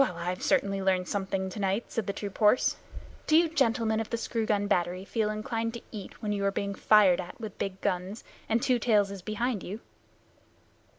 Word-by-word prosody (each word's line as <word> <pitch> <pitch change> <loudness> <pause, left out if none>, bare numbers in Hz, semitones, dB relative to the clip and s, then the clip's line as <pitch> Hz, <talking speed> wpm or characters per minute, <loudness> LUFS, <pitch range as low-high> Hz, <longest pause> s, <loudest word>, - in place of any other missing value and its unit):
"Well, 185 -10 -2
I've 180 +2 -3
certainly 195 0 +1
learned 185 -1 +1
something 195 -1 -2
tonight," 200 +2 -1
said 225 - -2
the 200 - -1
troop 200 -1 -6
horse. 215 +3 +4 0.5
"Do 310 - +6
you 335 0 +5
gentlemen 230 -8 +1
of 225 - -3
the 230 - -1
screw 225 -1 -2
gun 205 -1 +1
battery 180 -1 0
feel 220 0 0
inclined 225 +2 -2
to 235 - -6
eat 210 +1 -9
when 210 - -1
you 200 -1 -1
are 195 - +2
being 200 0 -2
fired 195 -3 +5
at 180 - -10
with 220 -3 -7
big 190 -1 -3
guns, 185 +4 -2 0.3
and 225 +1 +2
Two 250 -2 +2
Tails 210 -4 +3
is 200 -2 -7
behind 215 +2 -2
you?" 200 +6 -6
205 Hz, 200 wpm, -29 LUFS, 190-225 Hz, 0.5 s, Do